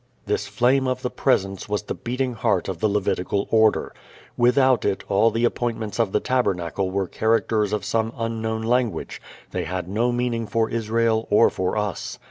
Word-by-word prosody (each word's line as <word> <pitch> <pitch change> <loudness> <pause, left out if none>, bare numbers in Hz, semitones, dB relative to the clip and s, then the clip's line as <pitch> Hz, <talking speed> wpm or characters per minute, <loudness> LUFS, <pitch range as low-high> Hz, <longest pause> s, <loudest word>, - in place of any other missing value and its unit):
This - - -1
Flame 130 +2 +2
of 130 0 -2
the 125 - -2
Presence 95 -7 0
was 105 0 -1
the - - -4
beating 125 +1 -3
heart 110 - 0
of 95 -4 -4
the 110 - +2
Levitical 100 -1 -1
order. 110 -1 +3 0.4
Without 125 +1 +3
it 100 - -1
all 100 +3 +4
the 115 +2 0
appointments 115 -3 -2
of 110 -4 +2
the - - +2
tabernacle 95 -7 -1
were 95 +1 -1
characters 110 -1 +1
of 105 -3 -2
some 115 0 0
unknown 110 -1 -2
language; 120 -1 -1 0.3
they - - -2
had 90 0 -4
no 115 +6 0
meaning 120 -2 -1
for 115 0 0
Israel 115 0 0
or 105 +2 +5
for 95 +3 -2
us. 105 -5 -3
110 Hz, 175 wpm, -23 LUFS, 100-120 Hz, 0.4 s, or